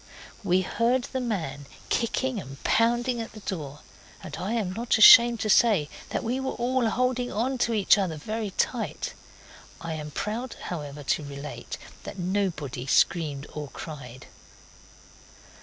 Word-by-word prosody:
We 185 -1 +3
heard 240 +6 +1
the 260 - -1
man 160 - -3 0.2
kicking 245 +1 0
and 135 0 -11
pounding 240 +1 +2
at 225 - -7
the 215 - -10
door, 150 -8 -5 0.4
and - - -7
I 190 +6 -3
am 205 -6 -1
not 230 +2 +1
ashamed 235 +1 +9
to - - -1
say 200 -10 +4 0.2
that - - -2
we 245 +3 -1
were 265 0 -2
all 245 -1 +1
holding 250 +1 0
on 250 +5 -1
to 235 - +1
each 210 -1 +4
other 180 -5 -1
very 215 +7 -3
tight. - - -2 0.7
I 165 -1 -5
am 150 -1 -5
proud, 220 - -4
however, 150 -4 -6
to 150 - 0
relate 140 +1 -7 0.2
that - - -8
nobody 175 -9 -2
screamed 145 -2 +2
or 150 -1 -5
cried. 130 -3 -9
200 Hz, 150 wpm, -26 LUFS, 150-235 Hz, 0.7 s, ashamed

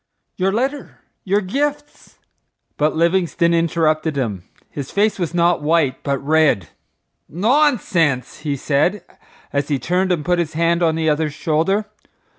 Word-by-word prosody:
—Your 190 +1 0
letter—your 230 -5 -3
gifts—" 290 +9 -4 0.6
But 150 +1 0
Livingstone 170 0 +1
interrupted 160 -2 +1
him. 105 -10 -3 0.3
His 140 -2 -6
face 205 0 +1
was 175 -2 -3
not 170 -1 +2
white 150 -3 +1
but 140 -1 -1
red. 155 - +2 0.6
"Nonsense!" 185 - +1
he 150 -2 -2
said, 155 +9 0 0.5
as 140 0 0
he 145 - 0
turned 180 +8 0
and 165 -4 -1
put 175 0 +1
his 165 -2 -2
hand 170 +2 +1
on 160 -2 +2
the 160 0 -1
other's 150 -1 0
shoulder. 165 +8 0
170 Hz, 135 wpm, -19 LUFS, 150-190 Hz, 0.6 s, not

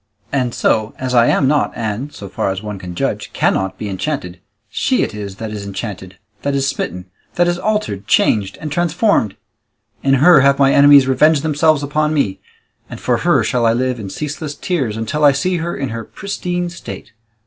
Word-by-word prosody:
And 125 -3 0
so, 110 0 +1
as 130 -1 -3
I 120 -1 +5
am 135 - +3
not 150 +1 +2
and, 115 +5 -3
so 100 - -9
far 95 - -2
as 95 +1 -4
one 105 -2 -6
can 90 -1 -8
judge, - - -2
cannot 95 0 0
be 105 - -5
enchanted, 95 - -4 0.3
she 255 - 0
it - - -3
is 100 -2 -6
that 110 +1 -6
is 105 -1 -5
enchanted, 100 -2 -7 0.2
that 140 0 -1
is 135 0 +1
smitten, 90 -8 -3 0.3
that 175 0 +3
is 175 0 0
altered, 210 - -2
changed, 100 -3 +2
and 155 -2 -6
transformed; 175 - +1 0.7
in 135 0 +3
her 155 +4 +6
have 140 +1 +4
my 135 -1 +4
enemies 140 -1 +7
revenged 140 +3 +3
themselves 155 -1 +2
upon 150 +2 0
me, 100 -10 0 0.5
and - - -8
for - - +1
her - - +2
shall 120 -2 +1
I 115 - +3
live 125 0 -1
in 100 -3 -6
ceaseless 150 +4 -5
tears, 135 - -2
until 130 +8 -2
I 145 -1 +7
see 180 +6 0
her 170 +1 -3
in 135 -2 -3
her 115 -1 -5
pristine 180 - -4
state. 170 -8 -9
135 Hz, 195 wpm, -17 LUFS, 105-150 Hz, 0.7 s, enemies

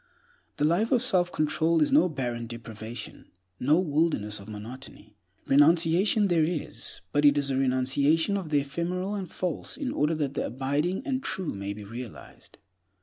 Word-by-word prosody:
The 145 - +2
life 180 - +2
of 250 -2 +3
self 180 -7 +2
control 160 +2 +1
is 150 - +2
no 280 -9 +5
barren 120 -5 -3
deprivation, 115 0 -8 0.3
no 145 +5 +3
wilderness 150 - 0
of 100 +2 -11
monotony. 110 0 -10 0.3
Renunciation 170 +8 +4
there 170 -4 +3
is, 160 0 -3
but 145 - +1
it 145 0 +6
is 140 -1 +1
a - - 0
renunciation 135 +7 +2
of 190 -5 -3
the 145 -2 +3
ephemeral 175 +7 -3
and 195 -4 -5
false 180 -4 -3
in 275 -4 -3
order 150 - +1
that 145 -3 -2
the - - -2
abiding 145 - -1
and 265 -2 -1
true 190 - -3
may 100 +1 -4
be 105 0 -9
realized. 115 +2 -10
150 Hz, 165 wpm, -27 LUFS, 125-175 Hz, 0.3 s, it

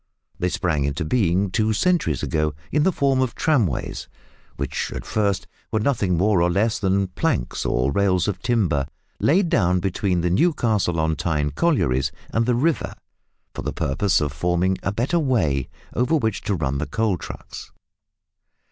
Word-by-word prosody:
They 90 - +1
sprang 80 -6 0
into 70 +4 -2
being 95 -1 +1
two 110 +2 +1
centuries 150 - +1
ago 75 -2 0 0.2
in 150 - +2
the 190 +5 +3
form 135 -5 +1
of 130 -2 -1
tramways, 120 - 0 0.5
which - - -3
at - - -6
first 100 -3 0 0.3
were 110 - +1
nothing 105 -7 +1
more 95 0 +3
or 85 - +3
less 105 +5 +1
than 95 -1 +1
planks 140 - -1
or 65 +3 +1
rails 95 +1 +2
of 100 -3 -2
timber 90 - +1 0.3
laid 175 +4 +3
down 90 - +2
between 90 0 0
the 90 0 0
Newcastle 105 - +1
on 80 0 +1
Tyne 75 -1 -1
collieries 75 - +1 0.2
and 115 +1 +1
the 125 - +3
river, 155 +6 0 0.6
for - - -5
the - - -3
purpose 80 +8 +1
of 75 -1 -1
forming 90 +4 +1
a 95 - -1
better 125 - 0
"way" 80 - +1 0.2
over 125 +7 +1
which 110 -9 0
to 100 - 0
run 70 -4 -1
the 75 - -2
coal 110 -3 0
trucks. - - -9
95 Hz, 165 wpm, -23 LUFS, 80-120 Hz, 0.6 s, the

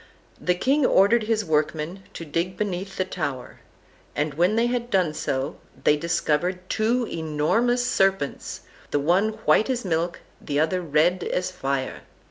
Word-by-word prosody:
The 180 - +1
king 275 +10 +2
ordered 215 0 +4
his 220 -1 0
workmen 155 +3 -1
to 165 - -6
dig 170 +5 -2
beneath 195 -1 -3
the 185 - +1
tower, 140 - -5 0.6
and 150 0 -1
when 175 +8 +2
they 230 +1 +3
had 240 0 -1
done 185 -7 +2
so 135 -2 -2 0.3
they 150 - +5
discovered 175 +3 -1
two 235 +3 +1
enormous 170 +11 0
serpents, 195 - 0 0.3
the - - +1
one 185 +9 +2
white 220 - +4
as 245 -4 -1
milk 170 0 -1 0.2
the 145 -1 -1
other 160 +4 +1
red 170 +3 +2
as 180 0 -1
fire. 135 -6 -3
180 Hz, 150 wpm, -24 LUFS, 155-210 Hz, 0.6 s, they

